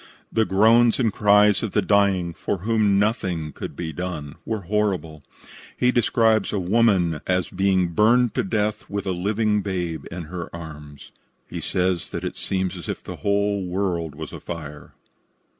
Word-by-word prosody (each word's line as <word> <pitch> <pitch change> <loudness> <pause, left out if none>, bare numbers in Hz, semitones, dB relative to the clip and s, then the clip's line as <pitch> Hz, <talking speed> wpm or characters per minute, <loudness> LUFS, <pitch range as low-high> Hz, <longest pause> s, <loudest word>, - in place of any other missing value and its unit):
The 110 -1 +3
groans 110 +6 +4
and 115 -5 +1
cries 105 0 +4
of 110 - -3
the 105 - +3
dying, 95 -4 +2
for 85 +4 -3
whom 110 -3 +3
nothing 95 -7 0
could - - -7
be 80 -2 -5
done, 80 -4 -5
were 110 -2 -2
horrible. 95 -6 -1 0.6
He 125 0 +3
describes 115 -3 +2
a 105 - -1
woman 90 -5 +2
as 90 -1 0
being 95 -1 +2
burned 115 +6 +3
to - - 0
death 105 +1 -2
with 100 0 -3
a 95 - -1
living 105 +3 0
babe 90 -5 -3
in 85 0 -6
her 85 +2 -6
arms. 75 -4 -10 0.4
He - - -6
says 90 -1 -1
that - - -5
it - - -4
seemed 95 -1 -2
as - - -8
if - - -4
the - - -7
whole 100 0 0
world 90 -4 -2
was - - -8
afire. 75 -4 -8
95 Hz, 165 wpm, -23 LUFS, 85-105 Hz, 0.6 s, groans